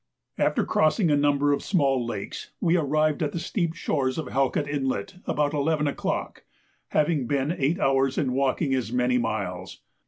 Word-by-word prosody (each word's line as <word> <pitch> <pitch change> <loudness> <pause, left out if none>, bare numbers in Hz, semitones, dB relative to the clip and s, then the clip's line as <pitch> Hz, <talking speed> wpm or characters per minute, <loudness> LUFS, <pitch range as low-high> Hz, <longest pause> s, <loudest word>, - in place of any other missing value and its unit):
After - - +2
crossing 155 +2 +2
a - - +5
number 145 0 +2
of 140 - -1
small 135 -9 +1
lakes, 120 - -5
we 170 +1 +2
arrived 155 0 +1
at 150 - -1
the 170 - -2
steep 170 -1 -2
shores 130 -6 -1
of 160 - -2
Halkett 135 +2 0
Inlet 145 +5 -2
about 145 0 0
11 150 +1 +1
o'clock, 145 - -3 0.4
having 150 -4 +1
been 140 +2 0
eight 160 +2 0
hours 135 -2 +2
in 130 -4 0
walking 135 +2 +1
as 125 -4 -1
many 125 0 +2
miles. 95 -5 -4
145 Hz, 165 wpm, -25 LUFS, 130-155 Hz, 0.4 s, a